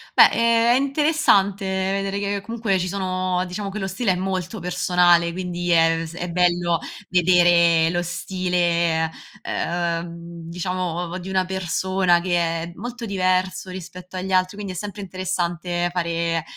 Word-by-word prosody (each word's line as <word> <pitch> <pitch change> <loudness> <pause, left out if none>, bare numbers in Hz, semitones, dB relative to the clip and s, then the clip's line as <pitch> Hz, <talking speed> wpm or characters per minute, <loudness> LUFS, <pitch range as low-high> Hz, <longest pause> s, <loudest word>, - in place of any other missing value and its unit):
beh, - - +9
ehm, 230 0 +3
è - - +4
interessante 275 -9 +2
vedere 195 +1 -1
che, 200 0 -2
comunque 220 -3 -1
ci 180 - -2
sono 185 -1 -1
diciamo 195 +3 -5
che 200 - -6
lo 195 - -2
stile 195 +3 0
è - - -2
molto 185 +2 -3
personale, 175 -1 +3
quindi 175 -1 -4
è 165 -1 +4
vs 165 0 -8
è 175 0 -4
bello 175 -1 +2 0.3
vedere 175 -2 +4
lo 175 0 0
stile, 175 -2 0 0.4
ehm, 170 -1 -3
diciamo 180 +2 -3
ov 175 0 -3
di 185 +1 -7
una 190 -1 +1
persona 185 -1 +1
che 175 0 0 0.3
è 170 - -7
molto 240 +5 -6
diverso 185 -2 0
rispetto 180 0 -9
agli 190 +1 -4
altri, 185 +1 +2
quindi 200 -2 -5
è - - -10
sempre 205 +2 -6
interessante 175 -2 -2
fare, 170 -2 -1
180 Hz, 150 wpm, -22 LUFS, 175-190 Hz, 0.4 s, beh